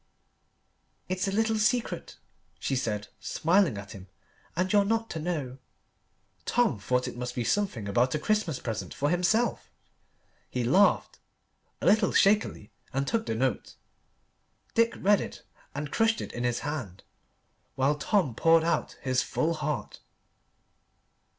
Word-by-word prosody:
"It's 185 +1 -1
a - - 0
little 220 +1 +1
secret," 240 +3 0 0.4
she 135 - -2
said, 105 -5 -2
smiling 170 - +2
at 100 +1 -8
him, 95 -2 -10 0.5
"and 185 +4 0
you're 205 -1 +6
not 225 +2 -1
to 160 - -4
know." 150 -6 -3 0.8
Tom 240 - +1
thought 125 +5 0
it - - -6
must 125 0 -5
be 120 - -1
something 160 - -1
about 120 +7 +2
a - - +2
Christmas 210 -5 0
present 110 -2 -5
for 145 +2 0
himself. 215 +7 +1 0.8
He 125 - -2
laughed 185 +12 +3 0.6
a - - -3
little 210 -1 +4
shakily 200 - +2 0.2
and 135 +1 -1
took 225 -1 0
the 110 - -1
note. 125 -1 -1 1.0
Dick 230 0 +3
read 205 +1 +3
it - - -8 0.3
and 145 0 -4
crushed 225 -1 +2
it - - -5
in 120 +1 -3
his 120 -1 0
hand 130 - -5 0.7
while 135 +2 +2
Tom 150 - +1
poured 165 +6 +4
out 170 +1 -1
his 130 -1 +2
full 165 +2 0
heart. 150 -2 -4
155 Hz, 145 wpm, -28 LUFS, 125-205 Hz, 1.0 s, you're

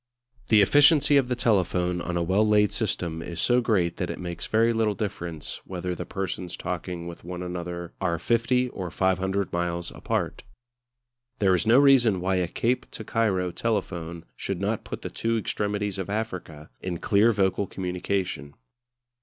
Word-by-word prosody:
The 105 -2 +6
efficiency 145 - +5
of 135 -3 +3
the 125 - 0
telephone 90 -6 +1
on 85 0 -2
a 85 - +1
well 95 +5 +2
laid 105 -1 +4
system 85 -7 -2
is 85 -1 -6
so 125 +6 +3
great 95 -8 +1
that 90 - -2
it - - -4
makes 85 -2 -5
very 115 +1 +3
little 110 -2 +1
difference 85 -6 -5
whether 90 -1 -4
the - - -6
persons 90 -2 -4
talking 90 -1 -4
with 85 0 -8
one 90 +1 -5
another 85 -1 -5
are 85 -3 +1
50 120 +6 +1
or 95 -6 -5
500 95 +2 0
miles 85 0 -2
apart. - - -2 1.0
There 95 -5 +3
is 90 +4 +1
no 115 +3 +6
reason 130 -8 +5
why 95 +1 0
a 90 -1 +1
Cape 120 +8 -1
to 110 - -7
Cairo 95 -5 0
telephone 85 -6 -3
should 95 -3 -4
not 105 +3 -1
put - - -7
the - - -4
two 115 0 0
extremities 105 -2 -2
of 95 - -4
Africa 90 - -5
in 90 -2 -3
clear 105 +6 +4
vocal 100 -1 +1
communication. 90 -6 -3
95 Hz, 170 wpm, -26 LUFS, 85-110 Hz, 1.0 s, The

